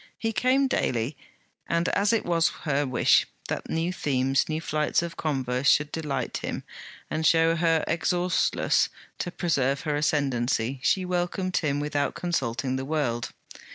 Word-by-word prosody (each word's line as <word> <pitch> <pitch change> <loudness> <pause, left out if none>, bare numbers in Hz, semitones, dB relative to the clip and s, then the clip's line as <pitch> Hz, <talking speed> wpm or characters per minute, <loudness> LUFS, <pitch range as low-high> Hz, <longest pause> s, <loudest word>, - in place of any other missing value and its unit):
He 225 -1 -2
came 255 +6 +3
daily, 125 - -1 0.5
and 170 +1 +1
as 200 +2 +2
it 230 - +1
was 170 -1 +3
her 145 -2 0
wish 125 -2 +3 0.2
that - - -4
new 165 +3 -1
themes, 135 -4 +1
new 155 0 -1
flights 155 0 0
of 170 -1 -5
converse, 130 -3 0
should 150 0 +3
delight 150 -5 -3
him - - -4 0.5
and 155 - -1
show 165 +1 +4
her 165 -1 +2
exhaustless, 175 +1 +1 0.3
to - - -2
preserve 140 -6 0
her 150 -2 -1
ascendancy, 135 -4 0
she 185 +5 +2
welcomed 180 +1 -1
him 145 -3 0
without 145 -1 -1
consulting 130 -7 -1
the 130 - -4
world. 135 -6 -1
155 Hz, 150 wpm, -26 LUFS, 135-170 Hz, 0.5 s, show